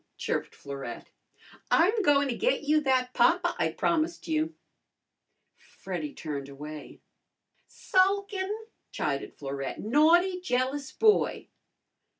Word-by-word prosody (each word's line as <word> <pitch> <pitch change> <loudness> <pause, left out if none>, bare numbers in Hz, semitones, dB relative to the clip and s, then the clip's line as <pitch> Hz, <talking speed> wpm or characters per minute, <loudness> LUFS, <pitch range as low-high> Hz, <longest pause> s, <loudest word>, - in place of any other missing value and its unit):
chirped - - -3
Florette. 135 -4 -8 0.6
"I'm 415 +7 +4
goin' 285 -5 +3
to 255 - -1
get - - 0
you 305 +1 +3
that 255 -2 +1
papa 335 +9 +3
I - - +2
promised 335 0 -1
you." 315 0 -1 1.2
Freddy 300 - -4
turned 145 - -6
away. 150 +2 -9 0.7
"Sulkin'!" 390 0 +1 0.4
chided 140 -1 -3
Florette. 135 -1 -5
"Naughty, 335 - +4
jealous 265 -1 -1
boy!" 430 -1 +2
290 Hz, 105 wpm, -28 LUFS, -, 1.2 s, I'm